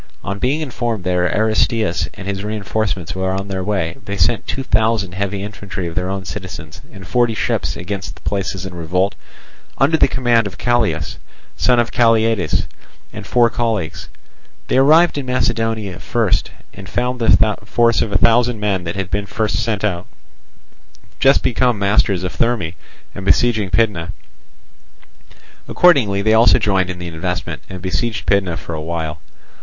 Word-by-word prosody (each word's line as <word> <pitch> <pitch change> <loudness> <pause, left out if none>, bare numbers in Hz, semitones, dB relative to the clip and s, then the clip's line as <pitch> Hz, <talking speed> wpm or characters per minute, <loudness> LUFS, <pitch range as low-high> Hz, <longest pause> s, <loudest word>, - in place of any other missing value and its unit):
On 100 +1 -4
being 140 +7 0
informed 120 - -3
that 90 - -1 0.2
Aristeus 110 -3 +1
and 100 -2 -8
his 100 0 -3
reinforcements 105 -3 -2
were 95 0 -2
on 95 +1 -3
their 95 -1 -3
way, 95 -5 -2
they 100 0 -5
sent 85 -3 +1
two 135 - -3
thousand 110 -6 +1
heavy 100 +1 -3
infantry 100 -3 -6
of 85 - -5
their 90 +2 -2
own 95 0 -4
citizens 80 -7 -7
and 95 -1 -11
forty 120 +2 +1
ships - - -1
against 95 +2 -5
the - - -18
places 95 -1 -3
in 95 - -7
revolt, 90 +3 0 0.6
under 145 +4 +3
the - - +5
command 120 -4 +2
of 95 - -10
Callias, 110 -11 0 0.4
son 125 -1 +3
of 120 -1 +1
Calliades, 115 -6 +2 0.5
and 105 -1 -8
four 120 -1 +4
colleagues. 110 -9 -2 0.6
They - - +2
arrived 155 +4 +5
in 135 - -6
Macedonia 115 -6 -1
first, 115 -5 0 0.2
and 95 -1 -10
found 125 +4 -1
the 110 -2 +4
force 115 +2 +2
of 105 - -2
a 100 - +3
thousand 115 +1 +3
men 100 -4 -1
that 85 - -4
had 95 -2 -4
been 100 0 -1
first 105 -3 -1
sent 105 -3 -1
out, 90 -4 -1 1.1
just 135 +1 +4
become 125 -1 +2
masters 100 -2 +2
of 90 - -4
Therme 115 -9 0 0.4
and 95 - -7
besieging 110 0 +2
Pydna. 100 -7 0 1.5
Accordingly 115 - +4
they 110 +1 +3
also 115 +3 +6
joined 95 -5 +1
in 90 - -4
the 90 0 -6
investment, 85 -2 -4
and 95 -2 -8
besieged 110 +3 -2
Pydna 95 -4 +1
for 85 - -7
a 80 - -4
while. 80 -1 -4
100 Hz, 165 wpm, -18 LUFS, 95-115 Hz, 1.5 s, also